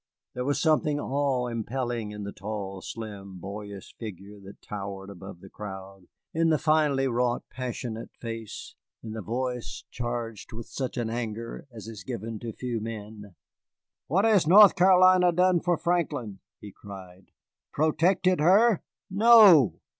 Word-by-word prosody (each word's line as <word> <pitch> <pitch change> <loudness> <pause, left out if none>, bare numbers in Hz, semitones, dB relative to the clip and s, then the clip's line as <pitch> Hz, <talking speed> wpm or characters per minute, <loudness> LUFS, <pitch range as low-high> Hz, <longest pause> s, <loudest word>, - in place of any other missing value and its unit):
There 125 0 -4
was 145 +1 0
something 155 -2 +2
awe 135 -3 0
impelling 120 -1 -3
in 105 0 -7
the 100 - -5
tall, 100 -1 -6
slim, 100 -4 -8
boyish 100 +1 -8
figure 105 -2 -9
that 100 0 -13
towered 100 -1 -7
above 95 -3 -11
the 95 - -12
crowd, 95 -2 -9 0.3
in 165 0 +2
the 155 - +3
finely 150 -4 +2
wrought, 120 -1 0
passionate 120 -2 -5
face, 115 -2 -7 0.3
in 110 - -7
the 110 0 -5
voice 125 +4 -4
charged 120 -3 -5
with 115 0 -7
such 130 -2 -5
an 115 -2 -2
anger 115 +1 -5
as 110 -2 -10
is 110 -6 -9
given 110 +4 -5
to 115 -1 -6
few 120 +1 -4
men. 105 -3 -8 0.7
"What 190 +8 +2
has 205 -8 +4
North 200 +3 +8
Carolina 185 -1 +5
done 180 +1 +3
for 175 0 0
Franklin?" 150 - -2 0.2
he 105 - -10
cried. 95 -2 -12 0.4
"Protected 175 +4 +2
her? 195 +6 +4 0.3
No. 200 - +6
120 Hz, 145 wpm, -27 LUFS, 105-155 Hz, 0.7 s, North